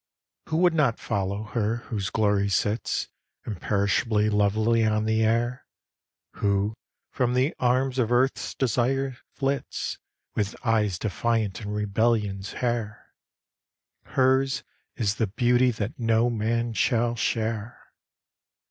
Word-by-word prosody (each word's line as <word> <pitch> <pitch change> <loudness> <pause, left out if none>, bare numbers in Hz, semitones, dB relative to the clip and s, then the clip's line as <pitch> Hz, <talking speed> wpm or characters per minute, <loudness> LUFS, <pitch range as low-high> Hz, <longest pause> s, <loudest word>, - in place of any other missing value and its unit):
Who 160 - 0
would 175 0 +4
not 140 -8 +2
follow 100 +1 -2
her 105 +1 -1 0.2
whose 100 -3 -1
glory 100 -2 +2
sits, 105 +3 0 0.4
Imperishably 105 +2 +1
lovely 110 +3 +2
on 110 0 +1
the 110 0 +2
air? 120 +3 0 0.7
Who, 100 +1 +1 0.4
from 125 -1 0
the 130 +6 +2
arms 130 +1 +1
of 120 -1 +1
Earth's 130 +2 +1
desire, 130 +1 0 0.2
flits 135 -1 -2 0.3
With 105 +1 -1
eyes 105 -5 +2
defiant 110 -1 -1
and 105 0 -4
rebellions 105 -1 0
hair? 115 -4 -3 0.9
Hers 130 +1 +2 0.3
is 105 -5 0
the 110 - +1
beauty 125 +4 +3
that 110 0 -4
no 115 +1 +2
man 115 +1 -1
shall 120 +1 +1
share. 110 -1 -2
115 Hz, 115 wpm, -26 LUFS, 105-125 Hz, 0.9 s, would